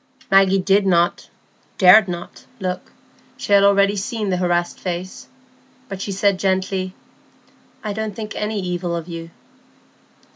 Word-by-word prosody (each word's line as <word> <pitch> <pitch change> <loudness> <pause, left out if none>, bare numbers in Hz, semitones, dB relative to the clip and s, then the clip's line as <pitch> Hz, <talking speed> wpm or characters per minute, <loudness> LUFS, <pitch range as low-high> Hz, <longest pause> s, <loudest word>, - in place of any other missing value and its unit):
Maggie 195 0 +5
did 195 +2 +2
not—dared 180 +3 +2
not—look. 180 +2 -7 0.5
She 205 - -2
had 200 0 +6
already 200 0 +4
seen 210 0 -3
the 180 - 0
harassed 175 -1 -1
face. 180 0 -6 0.6
But 195 -1 -6
she 200 - -4
said 195 0 +1
gently,— 190 -1 -1 0.9
"I 210 -2 -3
don't 215 -1 -4
think 220 -1 -6
any 210 0 -2
evil 180 -2 -3
of 165 0 -5
you." 165 -1 -7
190 Hz, 125 wpm, -20 LUFS, 180-200 Hz, 0.9 s, had